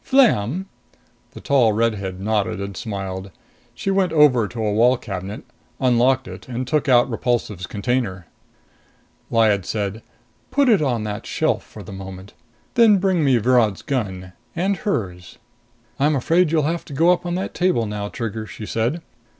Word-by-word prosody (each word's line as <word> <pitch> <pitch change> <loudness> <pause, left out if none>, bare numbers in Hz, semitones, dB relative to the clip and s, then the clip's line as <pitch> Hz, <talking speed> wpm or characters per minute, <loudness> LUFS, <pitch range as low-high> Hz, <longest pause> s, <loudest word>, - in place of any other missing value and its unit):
Flam 190 - +3 0.3
" - - -38
The - - -8
tall 125 -6 +3
redhead 105 -4 -1
nodded 105 0 -1
and 100 0 -5
smiled. 95 -2 -5 0.5
She 195 - -2
went 190 -3 +2
over 145 -8 +4
to 115 -1 -4
a 105 - 0
wall 120 +4 +4
cabinet, 95 -1 -6 0.4
unlocked 125 +1 +2
it - - -10
and 125 0 -4
took 150 0 0
out 120 0 +5
Repulsive's 115 -6 -2
container. 100 -4 -2 1.0
Lyad 110 -4 +3
said, 105 +1 -3 0.5
"Put 280 -2 +3
it 215 -8 +4
on 120 -7 0
that 105 -1 -5
shelf - - 0
for - - -12
the - - -10
moment. 95 0 -9 0.4
Then 225 -4 +6
bring 190 -3 +1
me 135 -3 +4
Virod's 115 -3 +2
gun, 95 -9 -3 0.2
and 190 +3 0
hers." 90 - -4 0.6
"I'm 150 +2 +3
afraid 165 +5 +2
you'll 160 -2 +2
have 165 +3 -1
to 145 - -10
go 165 +6 +4
up 180 - +1
on 175 0 -2
that 185 - -3
table 180 -11 +1
now, 105 -1 -4
Trigger," 110 -2 -5
she 105 - -8
said. 120 +11 -1
120 Hz, 165 wpm, -21 LUFS, 105-155 Hz, 1.0 s, Then